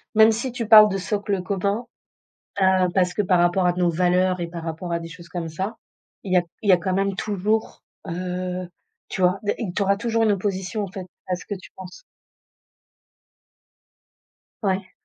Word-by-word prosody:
même 220 +1 +7
si 235 +3 -2
tu 235 -3 -4
parles 215 -1 +9
de 195 - -1
socle 200 +1 -2
commun, 200 +4 -1 0.8
heu, 190 -1 +4
parce 180 -2 +2
que 210 - +1
par 185 -3 +2
rapport 175 +1 +3
à 175 - +3
nos 180 -1 +1
valeurs 180 +1 +2
et 170 - -2
par 170 -1 -7
rapport 165 +2 -5
à 170 - 0
des 165 - -7
choses 170 0 -12
comme 170 -1 -4
ça. 195 +8 -4 0.5
Il 185 -2 -3
y - - +6
a - - +5 0.2
il 205 - -1
y - - +9
a - - +6
quand 185 +2 -2
même 195 0 0
toujours, 210 +2 -1 0.2
heu, 180 +1 -4 0.4
tu 185 - -4
vois, 180 +2 +3
des 205 - 0
et 215 -7 -3
tu 205 - -1
auras 200 0 +3
toujours 230 +1 0
une 210 -2 +4
opposition 195 +1 -2
en 190 - -6
fait 190 -2 -7 0.2
à 180 - 0
ce 180 - -11
que 205 - -4
tu 190 - -12
penses. 190 - -10 2.6
Ouais. 190 -2 -1
185 Hz, 200 wpm, -23 LUFS, 180-205 Hz, 2.6 s, parles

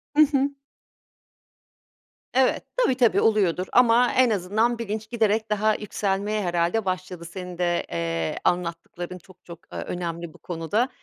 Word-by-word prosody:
Hı 305 - +6
hı. 275 0 +2 1.8
Evet, 260 0 +3
tabii, 380 - +3
tabii 225 -6 +4
oluyordur 190 -4 +2
ama 245 0 +5
en 255 -1 +4
azından 220 +4 +1
bilinç 220 -1 -4
giderek 220 -2 +1
daha 215 +1 +2
yükselmeye 205 0 -1
herhâlde 175 +5 0
başladı. 185 -2 -4
Senin 180 0 -7
de, 175 -1 0
eee, 85 -1 -2
anlattıkların 175 +1 -2
çok, 180 +1 -19
çok, 170 -1 -10
eee, - - -5
önemli 170 -2 -5
bu - - -16
konuda. 180 +9 -1
195 Hz, 135 wpm, -25 LUFS, 175-225 Hz, 1.8 s, Hı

